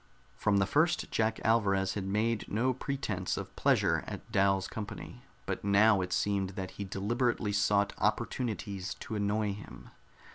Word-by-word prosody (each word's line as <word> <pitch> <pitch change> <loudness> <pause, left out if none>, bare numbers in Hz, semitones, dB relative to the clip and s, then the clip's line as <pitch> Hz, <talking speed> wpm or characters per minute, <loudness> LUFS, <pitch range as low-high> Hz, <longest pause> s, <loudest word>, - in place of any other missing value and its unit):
From 105 -1 +2
the 100 - +3
first 155 - +1
Jack 110 0 +1
Alvarez 100 -4 +2
had 100 -2 -3
made 105 +3 0
no 125 +5 +2
pretense 120 -8 -3
of - - -6
pleasure - - +2
at - - -8
Dal's 95 -1 +2
company, 105 -2 -7 0.2
but - - -3
now 100 0 +5
it 90 0 -4
seemed 100 0 0
that 95 -1 -4
he 100 - -6
deliberately 105 +3 0
sought 100 0 +2
opportunities 100 -5 -2
to - - -8
annoy 105 0 0
him. 100 0 -11
100 Hz, 150 wpm, -31 LUFS, 100-110 Hz, 0.2 s, now